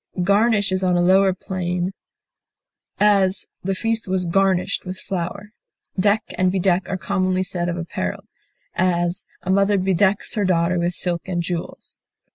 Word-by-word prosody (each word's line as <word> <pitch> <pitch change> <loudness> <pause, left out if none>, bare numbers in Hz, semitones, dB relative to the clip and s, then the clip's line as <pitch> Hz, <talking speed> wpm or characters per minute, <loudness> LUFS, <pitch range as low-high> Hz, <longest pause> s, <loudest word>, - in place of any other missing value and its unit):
Garnish 205 +1 +3
is 185 0 0
on 180 -1 +2
a - - +2
lower 190 +2 +5
plane; 180 -1 -3 1.1
as, 195 -2 +3 0.2
the 195 +1 -1
feast 225 +2 -1
was 185 -1 0
garnished 190 +1 +1
with 185 0 -6
flowers. 195 +2 -4 0.5
Deck 205 +2 +3 0.2
and 185 0 +3
bedeck 185 -1 +1
are 190 - -1
commonly 185 -1 0
said 175 -2 -2
of 175 - -2
apparel; 170 -1 -4 0.5
as, 175 0 0 0.2
a 185 - -1
mother 200 +1 +3
bedecks 190 +1 +1
her 210 - 0
daughter 175 -1 +2
with 175 +1 0
silk 175 -1 -2
and 175 -2 -1
jewels. 170 -1 -6
185 Hz, 150 wpm, -22 LUFS, 175-195 Hz, 1.1 s, lower